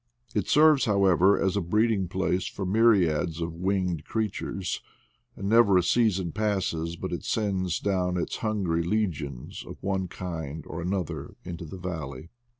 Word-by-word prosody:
It 105 - 0
serves, 150 -3 +5
however, 100 -2 +4
as 95 0 +1
a 100 - +1
breeding 105 +2 +1
place 90 0 -1
for 95 - -5
myriads 90 -6 +3
of 85 0 -3
winged 90 -2 -1
creatures 100 -3 -3
•, - - -34
and 100 - -3
never 110 -3 +5
a 90 - +3
season 95 -4 +2
passes 95 -5 -1
but 95 +1 -5
it 85 - -4
sends 95 -5 0
down 90 -2 0
its 85 - -2
hungry 100 -7 0
legions 85 - -2
of - - -9
one 95 -1 -1
Itfnd 80 -4 -5
or 85 - -6
another 90 -1 -3
into 85 -1 -6
the 90 +4 -8
valley. 80 -5 -6
95 Hz, 155 wpm, -27 LUFS, 85-100 Hz, -, serves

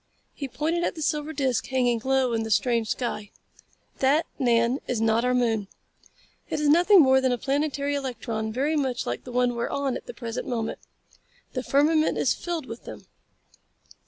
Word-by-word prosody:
He 280 - -5
pointed 320 +6 -1
at - - -1
the 315 - -4
silver 300 +1 -1
disc 270 -5 -1
hanging 245 -3 +1
low 265 -2 +2
in 225 - 0
the 220 - -4
strange 230 0 +1
sky. 215 -4 -3 0.7
"That, 285 +5 +3
Nan, 240 0 +2
is 245 -3 -1
not 225 +1 +2
our 250 0 +2
moon. 225 -5 +1 0.8
It - - -2
is 300 - +1
nothing 355 +6 +6
more 265 0 +4
than 260 -1 +2
a 245 - +1
planetary 285 +2 -1
electron 235 -5 -3
very 280 +7 0
much 265 -4 -1
like 120 - -4
the 250 - -8
one 245 0 +1
we 235 - -3
are - - -1
on 280 -2 -1
at - - -8
the 485 - -8
present 235 -1 -5
moment. 230 -3 -3 0.7
The 255 - -2
firmament 305 +4 +2
is - - +2
filled 340 -5 -4
with 230 -1 -9
them. - - -9
260 Hz, 190 wpm, -26 LUFS, 235-285 Hz, 0.8 s, nothing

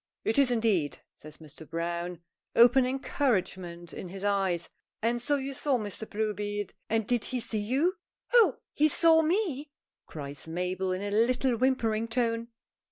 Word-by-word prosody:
"It 225 +5 +2
is, 275 -2 +4
indeed!" 220 -11 +1 0.2
says 155 0 -13
Mr. 155 0 -13
Browne, 170 +1 -3 0.3
open 245 +2 +6
encouragement 190 - -2
in 180 - -7
his 195 +2 -8
eye. 195 -3 +2 0.4
"And 235 +2 0
so 290 +4 +1
you 275 0 -3
saw 270 0 +1
Mr. 215 0 -6
Bluebeard! 205 -1 -2 0.2
And 225 -1 +1
did 240 0 0
he 255 - -2
see 220 -2 -3
you?" 265 - +1 0.4
"Oh! 445 - +6 0.2
he 305 - +4
saw 320 +1 +5
me!" 320 -4 0 0.4
cries 145 0 -6
Mabel, 180 +3 -2
in 185 +2 -2
a 205 - -3
little 245 +4 +2
whimpering' 230 -3 +1
tone. 230 -1 -1
225 Hz, 155 wpm, -29 LUFS, 185-260 Hz, 0.4 s, open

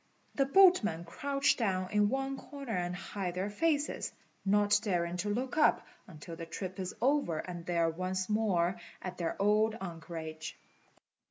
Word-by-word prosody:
The 275 -1 +2
boatmen 275 - +5
crouch 275 +10 +1
down 185 -5 0
in 210 -1 +3
one 270 +2 -1
corner 275 -4 -6
and 175 0 -1
hide 190 -1 -4
their 190 +3 -2
faces, 300 +4 0 0.3
not 205 +1 +4
daring 175 -5 0
to 205 +4 -2
look 250 +6 -2
up 305 - +4 0.2
until 165 -1 -9
the 165 0 -7
trip 185 +3 -5
is 185 -1 -4
over 265 - +2
and 175 0 -6
they 175 -1 0
are 165 -1 +3
once 185 +2 -2
more 195 -5 +1 0.3
at 185 -1 -6
their 170 +1 -2
old 215 +2 +3
anchorage. 160 -3 -6
195 Hz, 160 wpm, -32 LUFS, 175-230 Hz, 0.3 s, boatmen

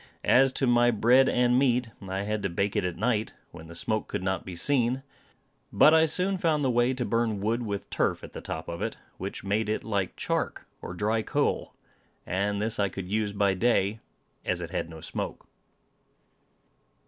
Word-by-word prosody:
As 135 +1 +5
to 135 - 0
my 120 -1 +4
bread 120 +4 +4
and 125 0 +3
meat, 125 -3 +2 0.2
I 95 +1 -2
had 105 +1 -2
to 95 - -1
bake 100 +4 -1
it - - +1
at 90 -1 -2
night 110 +1 0 0.2
when 80 - -11
the 85 - -11
smoke 110 +5 -1
could - - -4
not 95 -1 -1
be 90 - -7
seen. 130 +5 +1 0.7
But 155 - +6
I 160 0 +5
soon 185 +4 +1
found 160 -5 +1
the 130 - +2
way 120 +2 +2
to 125 -1 -2
burn 115 -3 0
wood 110 +4 0
with 100 -3 -4
turf - - 0
at - - -10
the - - -7
top 80 +1 -5
of 85 0 -5
it, - - -3 0.2
which - - -5
made 105 +2 0
it 110 - -1
like 100 -4 -2
chark, - - -2 0.2
or 90 - -6
dry 110 +4 +1
coal; - - -1 0.5
and 100 +2 -1
this 110 +1 0
I 100 -1 +2
could 95 0 -6
use 105 0 0
by 100 -1 +2
day, 105 0 +1 0.4
as - - -1
it - - -6
had - - -2
no 80 -1 -10
smoke. - - -5
110 Hz, 195 wpm, -27 LUFS, 100-125 Hz, 0.7 s, But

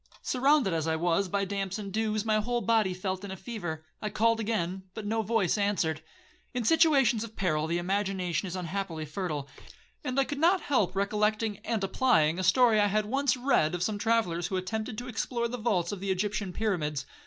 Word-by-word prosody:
Surrounded 265 - +3
as 160 -1 -1
I 160 - +1
was 175 +4 +1
by 200 +1 0
damps 195 0 -3
and 200 -3 -6
dews, 215 0 0
my 215 -1 +2
whole 240 +2 -1
body 225 -5 +2
felt 185 +1 -3
in 200 - -6
a 190 - -6
fever. 175 -7 -6 0.2
I 210 - -2
called 225 +2 +2
again, 195 -4 -1
but 220 - -6
no 225 +2 0
voice 215 -3 +1
answered. 175 -6 0 0.5
In 245 - 0
situations 275 -5 +4
of 225 -1 -9
peril, 155 -4 0
the 170 +1 0
imagination 190 0 -1
is 180 - -5
unhappily 180 -3 -4
fertile, 155 -3 -4 0.6
and 265 -2 -1
I - - +5
could 285 +1 -5
not 355 +4 +4
help 205 -10 +1
recollecting 210 +1 0
and 225 -3 -2
applying 190 -6 +2
a - - -1
story 235 +2 +5
I 205 - +4
had 210 +1 +1
once 270 +3 +1
read 245 - +2
of 175 - -2
some 205 +1 -1
travellers 205 -7 +1
who 190 - -2
attempted 215 +4 -3
to 245 - -5
explore 235 0 -2
the 245 +1 -5
vaults 195 -7 0
of 205 - -5
the 195 +1 -4
Egyptian 200 +1 -1
pyramids. 170 -9 -1
205 Hz, 200 wpm, -29 LUFS, 180-230 Hz, 0.6 s, I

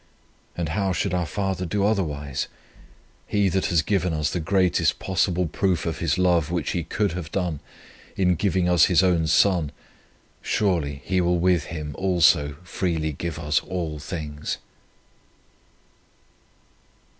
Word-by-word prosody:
And 85 -3 -2
how 95 +2 0
should 95 +1 -1
our 90 -2 0
Father 95 -2 -2
do 100 +3 0
otherwise? 75 -10 -1 0.8
He 100 -2 +2
that 95 +2 0
has 85 -3 +2
given 95 -3 0
us 75 -1 0
the 90 - -1
greatest 90 +1 +2
possible 90 -1 0
proof 90 +1 0
of 80 - -3
His 85 0 0
love 90 -4 +2
which 85 -3 -1
He 85 - -1
could 100 +4 -1
have 85 -2 -6
done, 90 -6 -2 0.6
in 90 -2 +3
giving 95 0 +1
us 90 -3 +5
His 90 0 +4
own 85 -3 +2
Son, 85 -2 +3 0.7
surely 75 -9 0
He 95 0 +1
will 90 0 +2
with 85 -3 +2
Him 75 -3 -6
also 85 -6 +3
freely 80 -3 -2
give 85 +4 -4
us 75 0 +1
all 85 -5 -4
things." 75 -1 -5
90 Hz, 145 wpm, -24 LUFS, 80-95 Hz, 0.8 s, us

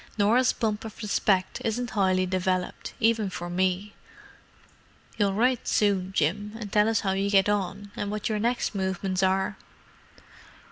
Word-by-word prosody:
"Norah's 230 +5 +4
bump 215 -2 -2
of 220 -2 -8
respect 195 -2 +1
isn't 235 +2 -2
highly 185 -2 +2
developed, 185 0 -2
even 225 -3 +2
for 175 -1 -6
me. 185 +3 0 1.3
You'll 200 -2 +2
write 250 +3 +1
soon, 195 -3 +1
Jim, 205 +5 0
and 210 -3 -7
tell 210 +1 +4
us 225 -2 +1
how 195 - 0
you 195 +1 0
get 195 -1 +4
on—and 205 0 -2
what 210 0 -3
your 215 -2 -1
next 235 +2 0
movements 190 -1 -1
are." 190 +2 +1
200 Hz, 145 wpm, -26 LUFS, 190-215 Hz, 1.3 s, Norah's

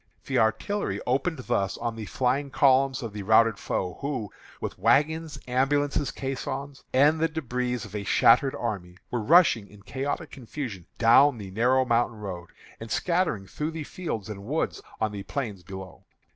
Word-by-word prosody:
The - - +1
artillery 110 - 0
opened 140 +6 0
thus 100 -5 0
on 115 -1 -3
the 110 -1 -6
flying 135 +3 0
columns 135 -1 +3
of 115 -3 -5
the 105 - -5
routed 110 +1 +4
foe, 90 -1 -3
who, 130 -8 -3 0.3
with - - -5
wagons, 150 - +2
ambulances, 140 +2 +1
caissons, 135 +1 -5
and 145 +5 +4
the 165 +1 +2
débris 125 -6 -2
of 105 -1 -10
a 105 - -3
shattered 130 +6 +4
army, 95 -6 -4
were 120 - -1
rushing 130 - +5
in 100 -1 -17
chaotic 140 +6 -3
confusion 120 - -7
down 120 +4 +6
the 100 -3 -8
narrow 125 +5 +3
mountain 120 -2 +1
road, 90 -5 -7 0.3
and 115 - -8
scattering 170 - 0
through 150 +10 -4
the 160 -1 -5
fields 145 - -5
and 100 -2 -7
woods 145 +9 -2 0.2
on 110 -1 0
the 100 -1 -5
plains 105 -2 -4
below." 95 +1 -10
125 Hz, 165 wpm, -27 LUFS, 105-140 Hz, 0.3 s, down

